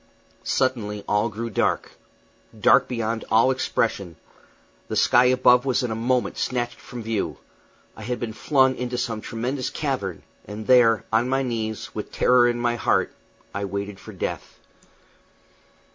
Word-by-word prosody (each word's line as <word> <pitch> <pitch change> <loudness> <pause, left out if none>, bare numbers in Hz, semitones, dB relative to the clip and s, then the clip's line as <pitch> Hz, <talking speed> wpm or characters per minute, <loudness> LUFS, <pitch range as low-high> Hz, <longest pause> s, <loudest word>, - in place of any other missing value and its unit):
Suddenly 105 -6 -1
all 105 +2 +1
grew 115 +2 -5
dark - - 0 0.7
dark - - +5
beyond 115 -2 -2
all 115 +4 +4
expression; 105 -8 -1 0.7
the - - -4
sky 120 +1 +5
above 125 -1 +5
was 130 -2 0
in 120 - -2
a - - -2
moment 125 +2 0
snatched 120 -1 -2
from 120 -2 -9
view; 110 -2 -2 0.6
I - - -11
had 120 +2 -3
been 110 -2 -4
flung 130 +2 +3
into 125 0 -3
some 115 -3 -2
tremendous 125 +4 -3
cavern; 125 - -3 0.2
and 105 +2 -7
there, 115 -3 +5
on 115 +3 +2
my 135 +1 +1
knees, 110 -3 -4
with 105 - -6
terror 125 -1 +4
in 120 - -1
my 120 0 0
heart, - - +1 0.4
I 100 - -3
waited 100 0 -5
for - - -11
death. - - -5
115 Hz, 150 wpm, -24 LUFS, 110-125 Hz, 0.7 s, dark